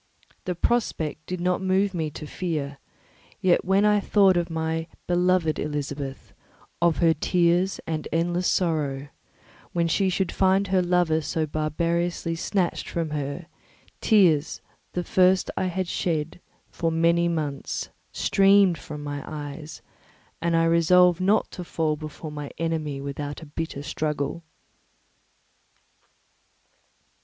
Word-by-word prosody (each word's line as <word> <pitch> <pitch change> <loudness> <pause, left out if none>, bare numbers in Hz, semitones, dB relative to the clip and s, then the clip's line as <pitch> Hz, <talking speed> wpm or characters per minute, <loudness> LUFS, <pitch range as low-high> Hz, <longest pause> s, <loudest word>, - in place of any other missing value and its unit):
The 180 - -2
prospect 160 -8 -1
did 180 0 -3
not 180 +1 0
move 190 +1 +1
me 160 -3 -2
to 150 - -8
fear; 150 -4 -4 0.6
yet 180 -2 +3
when 195 +2 +3
I 210 0 +4
thought 195 -2 +4
of 175 0 0
my 160 0 -2 0.2
beloved 180 -2 +2
Elizabeth, 145 -2 -4 0.5
of 170 -2 +3
her 165 -2 +4
tears 175 +4 +1
and 155 -2 -3
endless 175 +2 0
sorrow, 145 -6 0 0.6
when 170 -1 +1
she 190 +3 +2
should 185 0 0
find 190 +1 +2
her 190 -1 +3
lover 175 -3 +2
so 160 +1 -1
barbarously 165 +3 -1
snatched 175 +2 -1
from 165 -2 -2
her, 145 +3 -4 0.6
tears, 175 -9 +3 0.3
the 180 - -1
first 185 +1 +3
I - - 0
had 185 0 -2
shed 165 -1 -2 0.3
for 165 -1 -1
many 170 +1 +3
months, 150 -5 -3 0.2
streamed 195 -3 +4
from 150 -2 -8
my 145 -1 -4
eyes, 150 0 -7 0.6
and 170 0 +1
I 165 - +4
resolved 175 +2 +4
not 200 +4 +2
to 180 - -6
fall 160 -2 -1
before 155 +1 -8
my 145 -1 -6
enemy 160 -4 -2
without 145 +2 -5
a - - -8
bitter 145 -1 -5
struggle. 150 +1 -2
165 Hz, 130 wpm, -25 LUFS, 150-180 Hz, 0.6 s, I